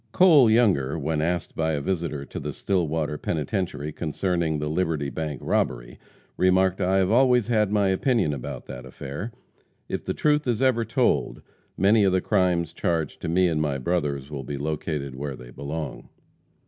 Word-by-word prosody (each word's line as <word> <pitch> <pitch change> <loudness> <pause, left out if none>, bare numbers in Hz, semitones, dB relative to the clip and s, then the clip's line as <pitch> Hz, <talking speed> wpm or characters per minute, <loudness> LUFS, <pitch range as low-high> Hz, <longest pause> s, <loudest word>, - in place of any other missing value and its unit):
Cole 155 -10 +6
Younger, 95 - +3
when 80 0 -1
asked 85 0 -2
by 80 0 0
a 75 - 0
visitor 80 -3 -2
to - - -7
the - - -5
Stillwater 80 -5 -1
penitentiary 75 -2 -2
concerning 85 0 -1
the 75 0 -3
Liberty 80 -3 -1
bank 75 -4 -4
robbery, - - -1 0.4
remarked, 95 0 +3
"I 95 +1 +2
have 95 0 +2
always 125 -1 +4
had 105 -3 +2
my 100 -2 +2
opinion 95 - +1
about 65 -4 -6
that 65 -1 -8
affair. 75 - -7 0.6
If - - -4
the - - -3
truth 150 -1 +2
is 120 -3 +1
ever 130 -3 +2
told, - - 0 0.3
many 105 +3 +4
of 95 -2 +3
the 95 - +3
crimes 85 -3 +1
charged 80 -3 -2
to - - -3
me 90 +2 +3
and 80 -3 0
my 75 -3 0
brothers 70 -2 -2
will 70 -2 -5
be 70 +2 -5
located 75 -1 -3
where 70 +1 -5
they 60 -1 -12
belong." 70 +1 -6
80 Hz, 175 wpm, -25 LUFS, 75-95 Hz, 0.6 s, Cole